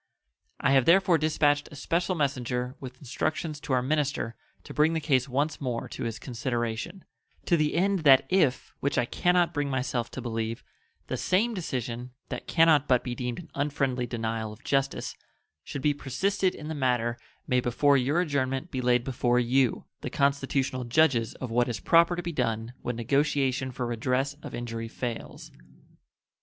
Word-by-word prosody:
I 135 - +2
have 135 -2 +5
therefore 175 -1 +5
dispatched 150 -1 +2
a - - -10
special 170 +6 0
messenger 125 -4 -1
with 130 -1 -8
instructions 150 +3 -3
to 140 - -3
our 125 -1 +2
minister 145 -4 0 0.3
to - - -9
bring 155 +2 +3
the 165 - 0
case 135 -4 +1
once 145 +5 -1
more 125 -4 -2
to - - -5
his 115 -1 -3
consideration, 120 - -3 0.4
to 170 - +3
the 150 -2 +1
end 195 +2 +2
that 135 -4 +6
if 155 -9 +1
(which 140 - -1
I 120 - +3
can 180 +8 +1
not 175 -1 +3
bring 145 -2 -1
myself 125 -2 -1
to - - -7
believe) 115 -1 -3 0.4
the - - -3
same 220 +6 +1
decision 125 - -4 0.2
(that - - -6
can 165 -1 +5
not 150 -3 +4
but 125 -2 +3
be 125 - -3
deemed 125 -1 -3
an 170 -2 -10
unfriendly 135 -3 -1
denial 115 -2 -3
of 110 +4 -13
justice) 135 -1 -1 0.5
should 140 - -6
be 150 - +3
persisted 185 +8 0
in 150 - -8
the 160 - -3
matter 120 -4 0 0.3
may 125 - +2
before 135 +4 +3
your 140 +6 +2
adjournment 140 -1 -1
be 130 - -2
laid 125 -1 +3
before 125 -1 +1
you, 125 +1 +2
the - - -5
constitutional 135 -2 0
judges 120 -2 +2
of 130 -3 -6
what 120 +1 +2
is 120 - -3
proper 170 +1 +4
to 175 - -4
be 170 - -3
done 115 -3 -1
when 120 - -3
negotiation 135 +1 +1
for 125 0 -3
redress 125 +4 0
of - - -7
injury 115 -1 -4
fails. 115 0 -6
135 Hz, 180 wpm, -28 LUFS, 120-150 Hz, 0.5 s, that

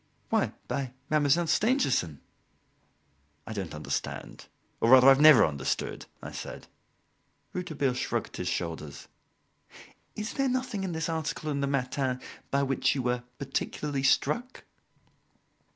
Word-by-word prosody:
"Why - - +1
by 130 -3 -3 0.2
Mademoiselle 155 +2 +3
Stangerson." 160 - +1 1.2
"I 110 - -6
don't 95 -7 -5
understand, 75 - -5 0.3
or 115 - +2
rather, 130 0 +8
I - - +10
have 135 +1 +4
never 155 -5 +9
understood," 70 -3 -3 0.2
I - - -6
said. - - -7 0.9
Rouletabille 150 -7 -1
shrugged 125 - -3
his - - -3
shoulders. 80 -4 -4 1.1
"Is 215 +1 -4
there 275 -1 +1
nothing 255 -6 -2
in 185 -3 -3
this 160 0 -2
article 155 -2 -2
in 140 -1 -1
the 140 - +1
'Matin' 130 -1 -1 0.3
by 140 0 +1
which 135 0 +1
you 130 - -1
were 125 0 0 0.2
particularly 140 +1 -3
struck?" 240 - +1
140 Hz, 130 wpm, -28 LUFS, 125-160 Hz, 1.2 s, I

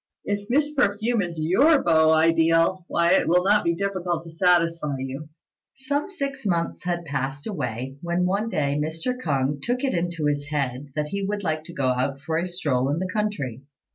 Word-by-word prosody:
If 205 0 -3
Miss 295 +4 +2
Perfume 225 -3 +1
is 170 -3 -4
your 265 - +4
beau 160 -2 +4
ideal, 165 +2 +3
why 170 0 +2
it 190 - +4
will 180 +1 +4
not 205 +2 +4
be 170 0 +1
difficult 185 -3 -2
to 165 - -11
satisfy 165 -3 +2
you." 135 +3 -6 0.5
Some 285 +5 -2
six 275 -7 -5
months 170 -5 -1
had 175 -1 -2
passed 140 -1 -3
away, 130 - -4
when 175 +1 0
one 200 +5 0
day 145 -6 0
Mr. 165 +11 -3
K'ung 145 - -1
took 245 +2 -1
it 270 - +1
into 170 -2 -1
his 145 -1 0
head 140 -2 -2
that 150 -1 -2
he 200 +3 -3
would 205 +1 -2
like 155 -3 -1
to 170 - -9
go 130 -2 +1
out 130 +2 -1
for 160 +3 -2
a 175 - -2
stroll 140 -8 0
in 145 - 0
the 185 +1 -3
country. 160 - -2
170 Hz, 195 wpm, -24 LUFS, 150-200 Hz, 0.5 s, your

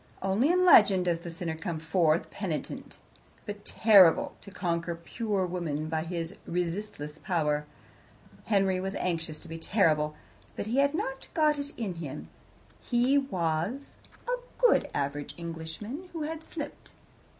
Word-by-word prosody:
Only 195 +9 +2
in 365 +1 +4
legend 195 - +7
does 170 -2 +1
the 170 - -7
sinner 165 0 -4
come 165 0 -4
forth 160 0 +2
penitent, - - -5 0.5
but 205 -1 -6
terrible, 195 -7 +6
to - - -11
conquer 170 -3 -2
pure 200 +3 -2
woman 160 -4 -3
by 160 0 -1
his 165 -1 -4
resistless 170 -3 -3
power. 150 -4 0 0.8
Henry 195 -3 +2
was 195 +2 -3
anxious 165 -3 -2
to - - -10
be 165 0 -6
terrible, 155 -5 +2 0.4
but - - -3
had 275 +6 +2
not 270 -4 -3
got 305 -2 +3
it 285 0 -4
in 215 -6 -2
him. 150 -4 -7 0.5
He 250 +3 +3
was 185 - -2 0.3
a - - +1 0.2
good - - +4
average 145 +1 -3
Englishman, 170 - -6
who 325 -2 -3
had 320 +1 -4
slipped. 305 -3 -8
180 Hz, 140 wpm, -29 LUFS, 165-230 Hz, 0.8 s, legend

